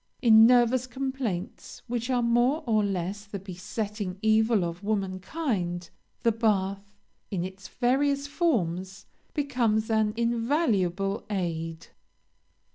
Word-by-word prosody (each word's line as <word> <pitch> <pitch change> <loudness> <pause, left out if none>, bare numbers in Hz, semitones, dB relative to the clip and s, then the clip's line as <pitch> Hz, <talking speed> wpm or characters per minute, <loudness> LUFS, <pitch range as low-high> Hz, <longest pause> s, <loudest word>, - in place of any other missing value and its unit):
In 225 -2 +7
nervous 245 +1 +4
complaints, 255 -7 -4
which 240 0 -3
are 250 -2 +2
more 240 +6 +2
or 215 -2 +2
less 195 +1 -2
the 205 -1 -7
besetting 195 +1 -5
evil 220 -1 +3
of 170 +3 -6
womankind, 190 - -2 0.3
the 230 - +4
bath, 200 -2 -1 0.3
in 180 -4 -2
its 190 0 -9
various 275 +3 +1
forms, 190 - -1 0.3
becomes 235 -7 +1
an 215 -1 +2
invaluable 230 - 0
aid. 165 -4 -3
215 Hz, 110 wpm, -27 LUFS, 190-240 Hz, 0.3 s, In